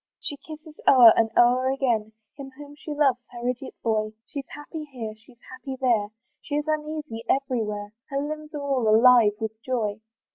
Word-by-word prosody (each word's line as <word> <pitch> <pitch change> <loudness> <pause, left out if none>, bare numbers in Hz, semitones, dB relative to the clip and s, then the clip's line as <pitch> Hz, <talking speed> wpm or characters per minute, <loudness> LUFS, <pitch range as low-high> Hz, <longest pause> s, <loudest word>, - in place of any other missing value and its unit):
She 290 - -2
kisses 310 +1 -12
o'er 240 -4 +9
and 225 -1 +2
o'er 250 +2 +4
again, 235 -5 -1 0.2
Him 275 -1 -9
whom 290 0 -11
she 305 - -12
loves, 285 -4 +2
her 240 0 -6
idiot 250 +1 -4
boy, 215 -1 0
She's 280 -2 -7
happy 305 +1 -8
here, 240 -7 -7
she's 235 +3 -20
happy 260 +1 -7
there, 235 -6 +2 0.3
She 290 - -4
is 295 0 -1
uneasy 305 -6 -3
every 260 -4 +1
where; 205 0 -5 0.2
Her 275 - -2
limbs 305 +1 -5
are 290 - -4
all 270 -5 0
alive 225 -1 +6
with 220 0 -5
joy. 220 -5 -2
255 Hz, 180 wpm, -25 LUFS, 225-290 Hz, 0.3 s, o'er